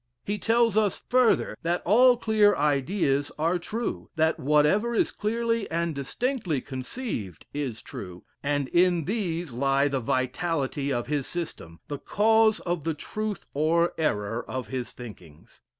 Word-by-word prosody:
He 205 Hz, +1 st, -2 dB
tells 230 Hz, 0 st, +3 dB
us 210 Hz, -3 st, +1 dB
further 250 Hz, -2 st, +3 dB
that 170 Hz, +2 st, -1 dB
all 245 Hz, +6 st, +6 dB
clear 215 Hz, -3 st, +4 dB
ideas 145 Hz, 0 st, +1 dB
are 165 Hz, +3 st, +1 dB
true 225 Hz, +7 st, -4 dB
that 160 Hz, 0 st, +2 dB
whatever 150 Hz, -, +3 dB
is -, -, +2 dB
clearly 230 Hz, +1 st, -1 dB
and 170 Hz, 0 st, -1 dB
distinctly 175 Hz, -, -2 dB
conceived 130 Hz, -, -5 dB
is 135 Hz, -6 st, -4 dB
true 90 Hz, -2 st, -9 dB, 0.2 s
and 145 Hz, -1 st, 0 dB
in 175 Hz, -2 st, +3 dB
these 175 Hz, -, -2 dB
lie 135 Hz, +3 st, +2 dB
the 140 Hz, -2 st, -1 dB
vitality 135 Hz, +3 st, -1 dB
of 120 Hz, -2 st, -1 dB
his 145 Hz, -3 st, -2 dB
system, 155 Hz, -, -6 dB
the 145 Hz, -1 st, -5 dB
cause 220 Hz, +1 st, +3 dB
of 175 Hz, -3 st, -2 dB
the 165 Hz, 0 st, -1 dB
truth 210 Hz, +3 st, -4 dB
or 165 Hz, +4 st, +2 dB
error 115 Hz, -6 st, -1 dB
of 130 Hz, -1 st, -5 dB
his 130 Hz, -2 st, -4 dB
thinkings. 90 Hz, -11 st, -13 dB
160 Hz, 145 wpm, -26 LUFS, 135-210 Hz, 0.2 s, all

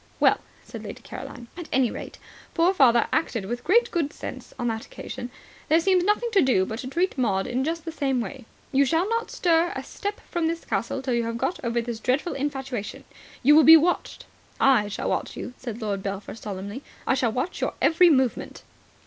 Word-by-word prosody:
"Well," -, -, +4 dB, 0.2 s
said -, -, -9 dB
Lady -, -, -8 dB
Caroline, 240 Hz, -2 st, -8 dB
"at 345 Hz, -2 st, -8 dB
any 255 Hz, -3 st, +2 dB
rate -, -, -8 dB, 0.4 s
poor 345 Hz, +3 st, +4 dB
father 240 Hz, -9 st, +5 dB
acted 240 Hz, -10 st, 0 dB
with 240 Hz, +4 st, -4 dB
great 475 Hz, +6 st, +3 dB
good 320 Hz, -5 st, 0 dB
sense -, -, -8 dB
on 240 Hz, -, -2 dB
that 225 Hz, -1 st, -2 dB
occasion. 245 Hz, -, -7 dB, 0.4 s
There 320 Hz, -, +5 dB
seems 365 Hz, +1 st, +3 dB
nothing 420 Hz, +4 st, +1 dB
to 400 Hz, -3 st, +5 dB
do 245 Hz, -8 st, +3 dB
but 220 Hz, +3 st, -5 dB
to 255 Hz, -, -5 dB
treat 340 Hz, +1 st, -1 dB
Maud 195 Hz, -6 st, +1 dB
in 255 Hz, +2 st, -1 dB
just 325 Hz, +2 st, -3 dB
the 330 Hz, -, -4 dB
same 270 Hz, -5 st, 0 dB
way. 220 Hz, -1 st, -6 dB, 0.3 s
You 275 Hz, +1 st, +4 dB
shall 325 Hz, +7 st, +1 dB
not 460 Hz, +1 st, -1 dB
stir 340 Hz, -1 st, +2 dB
a -, -, -4 dB
step 405 Hz, +1 st, -5 dB
from 340 Hz, -2 st, -1 dB
the 330 Hz, -, 0 dB
castle 275 Hz, -4 st, -3 dB
till 260 Hz, -2 st, -1 dB
you 235 Hz, -1 st, +1 dB
have 230 Hz, 0 st, -3 dB
got 340 Hz, +7 st, -2 dB
over 235 Hz, 0 st, 0 dB
this 235 Hz, -1 st, -5 dB
dreadful 265 Hz, +8 st, 0 dB
infatuation. 270 Hz, -6 st, -4 dB, 0.4 s
You 295 Hz, +4 st, +7 dB
will 315 Hz, -, +7 dB
be 325 Hz, +2 st, +10 dB
watched." 345 Hz, +3 st, -1 dB, 0.3 s
"I 250 Hz, -6 st, +4 dB
shall 205 Hz, -, -4 dB
watch -, -, -2 dB
you," 250 Hz, -, -6 dB
said 235 Hz, -3 st, -6 dB
Lord 200 Hz, -2 st, -2 dB
Belpher 195 Hz, 0 st, -5 dB
solemnly, 205 Hz, +2 st, -6 dB, 0.2 s
"I -, -, +2 dB
shall 255 Hz, -3 st, +1 dB
watch 255 Hz, +10 st, -3 dB
your -, -, -1 dB
every 345 Hz, +2 st, +5 dB
movement." 260 Hz, -5 st, 0 dB
265 Hz, 210 wpm, -25 LUFS, 235-335 Hz, 0.4 s, be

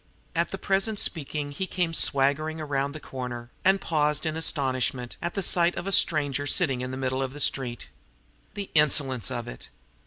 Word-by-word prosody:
At -, -, +1 dB
the -, -, -4 dB
present 195 Hz, +3 st, +1 dB
speaking 150 Hz, -5 st, 0 dB
he 190 Hz, +7 st, -3 dB
came 175 Hz, -3 st, -1 dB
swaggering 155 Hz, +2 st, +1 dB
around 140 Hz, -1 st, -2 dB
a -, -, -5 dB
corner, 125 Hz, -4 st, -6 dB
and 195 Hz, +1 st, +4 dB
paused 150 Hz, -2 st, +1 dB
in 155 Hz, 0 st, -1 dB
astonishment 130 Hz, -5 st, -1 dB
at 170 Hz, 0 st, -3 dB
the 195 Hz, -, 0 dB
sight 175 Hz, 0 st, +3 dB
of -, -, -4 dB
a 195 Hz, -, -2 dB
stranger 145 Hz, -6 st, +3 dB
sitting 135 Hz, -5 st, +2 dB
in 125 Hz, -, -3 dB
the 130 Hz, -, -4 dB
middle 130 Hz, 0 st, -1 dB
of 130 Hz, -1 st, -3 dB
the 145 Hz, -, -7 dB
street. 125 Hz, -, -1 dB, 0.7 s
The 200 Hz, -1 st, -5 dB
insolence 140 Hz, -5 st, +2 dB
of 120 Hz, 0 st, -4 dB
it! -, -, -9 dB
145 Hz, 185 wpm, -27 LUFS, 130-165 Hz, 0.7 s, and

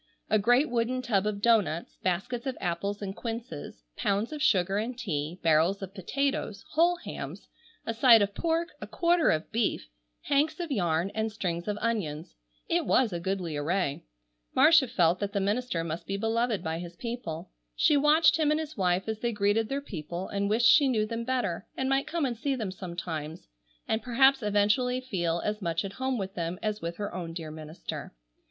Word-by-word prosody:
A 215 Hz, -, +5 dB
great 245 Hz, +8 st, +4 dB
wooden 245 Hz, +2 st, -1 dB
tub 210 Hz, -4 st, +1 dB
of 205 Hz, -1 st, -3 dB
doughnuts, 205 Hz, -8 st, +2 dB
baskets 235 Hz, +8 st, -2 dB
of 260 Hz, -, -3 dB
apples 200 Hz, +4 st, -2 dB
and 195 Hz, -1 st, -4 dB
quinces, 225 Hz, -, -6 dB
pounds 205 Hz, +7 st, 0 dB
of 300 Hz, -, -5 dB
sugar 195 Hz, -, +3 dB
and 240 Hz, +3 st, -3 dB
tea, 170 Hz, -7 st, -3 dB
barrels 165 Hz, +5 st, +3 dB
of 190 Hz, 0 st, -7 dB
potatoes, 215 Hz, +1 st, -2 dB
whole 340 Hz, +3 st, +4 dB
hams, 200 Hz, -, -8 dB, 0.4 s
a 230 Hz, -, -2 dB
side 230 Hz, -2 st, +7 dB
of 200 Hz, 0 st, -2 dB
pork, 335 Hz, +4 st, 0 dB
a -, -, -6 dB
quarter 345 Hz, -1 st, +2 dB
of 155 Hz, 0 st, 0 dB
beef, 215 Hz, -, -1 dB, 0.3 s
hanks 305 Hz, +3 st, +1 dB
of 340 Hz, -3 st, -4 dB
yarn, 175 Hz, -5 st, +1 dB
and 220 Hz, 0 st, -1 dB
strings 175 Hz, -4 st, -3 dB
of 210 Hz, 0 st, -1 dB
onions. 170 Hz, -10 st, -2 dB, 0.3 s
It -, -, +1 dB
was 245 Hz, -7 st, +3 dB
a 170 Hz, -, -2 dB
goodly 180 Hz, -3 st, -2 dB
array. 150 Hz, 0 st, -1 dB, 0.5 s
Marcia 315 Hz, -5 st, +6 dB
felt 175 Hz, -4 st, +2 dB
that 200 Hz, -1 st, -3 dB
the 200 Hz, -, +1 dB
minister 205 Hz, -2 st, -1 dB
must 165 Hz, +1 st, -5 dB
be 195 Hz, -, -2 dB
beloved 225 Hz, 0 st, 0 dB
by 160 Hz, +1 st, -2 dB
his 175 Hz, 0 st, -8 dB
people. 230 Hz, -9 st, -5 dB, 0.2 s
She 305 Hz, -, +4 dB
watched 305 Hz, +2 st, +5 dB
him 310 Hz, -2 st, +2 dB
and 305 Hz, +1 st, +2 dB
his 310 Hz, -1 st, -5 dB
wife 185 Hz, -1 st, +1 dB
as 220 Hz, -1 st, -3 dB
they 240 Hz, +1 st, 0 dB
greeted 210 Hz, +1 st, +1 dB
their 275 Hz, +1 st, -1 dB
people, 175 Hz, -, -6 dB
and 200 Hz, 0 st, -1 dB
wished 225 Hz, +3 st, +2 dB
she 280 Hz, +4 st, +7 dB
knew 220 Hz, -5 st, +2 dB
them 230 Hz, +1 st, -4 dB
better, 245 Hz, -9 st, -1 dB
and 265 Hz, -, 0 dB
might 270 Hz, +1 st, +1 dB
come 335 Hz, -3 st, -1 dB
and 245 Hz, -3 st, -1 dB
see 270 Hz, +4 st, -1 dB
them 215 Hz, -7 st, -3 dB
sometimes, 170 Hz, -4 st, -6 dB, 0.4 s
and 220 Hz, 0 st, 0 dB
perhaps 265 Hz, +2 st, +4 dB
eventually 210 Hz, +5 st, +2 dB
feel 175 Hz, -9 st, -1 dB
as 210 Hz, 0 st, -2 dB
much 170 Hz, 0 st, -1 dB
at 195 Hz, -, -6 dB
home 260 Hz, +2 st, -1 dB
with 195 Hz, -2 st, -4 dB
them 170 Hz, 0 st, -3 dB
as 215 Hz, -1 st, -2 dB
with 170 Hz, +1 st, -4 dB
her 205 Hz, -1 st, -4 dB
own 170 Hz, -2 st, -5 dB
dear 165 Hz, -2 st, -6 dB
minister. 155 Hz, -, -7 dB
210 Hz, 195 wpm, -28 LUFS, 175-250 Hz, 0.5 s, side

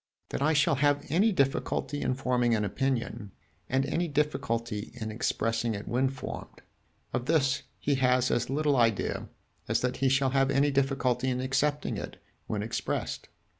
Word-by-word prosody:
"That -, -, -3 dB
I 155 Hz, +3 st, +3 dB
shall 150 Hz, -2 st, +3 dB
have 145 Hz, +1 st, +2 dB
any 195 Hz, +9 st, +3 dB
difficulty 145 Hz, -1 st, 0 dB
in 130 Hz, -, 0 dB
forming 125 Hz, -3 st, +1 dB
an 105 Hz, -1 st, 0 dB
opinion, 115 Hz, -2 st, -2 dB, 0.4 s
and 135 Hz, +1 st, +2 dB
any 170 Hz, +5 st, 0 dB
difficulty 115 Hz, -7 st, -1 dB
in 110 Hz, -3 st, -5 dB
expressing 115 Hz, 0 st, 0 dB
it 100 Hz, -, -7 dB
when 130 Hz, +2 st, +2 dB
formed 135 Hz, 0 st, -8 dB, 0.5 s
of 125 Hz, -, -2 dB
this 145 Hz, -4 st, +2 dB, 0.2 s
he 145 Hz, -, 0 dB
has 125 Hz, 0 st, +3 dB
as 120 Hz, 0 st, 0 dB
little 145 Hz, 0 st, +2 dB
idea 115 Hz, -4 st, +1 dB, 0.4 s
as -, -, +1 dB
that 125 Hz, 0 st, -1 dB
he 135 Hz, 0 st, +2 dB
shall 135 Hz, 0 st, +2 dB
have 135 Hz, 0 st, +3 dB
any 140 Hz, +1 st, +3 dB
difficulty 135 Hz, -2 st, +1 dB
in 125 Hz, 0 st, -1 dB
accepting 140 Hz, +3 st, 0 dB
it -, -, -7 dB, 0.3 s
when 105 Hz, -1 st, -2 dB
expressed." 115 Hz, -, -3 dB
130 Hz, 165 wpm, -29 LUFS, 120-140 Hz, 0.5 s, I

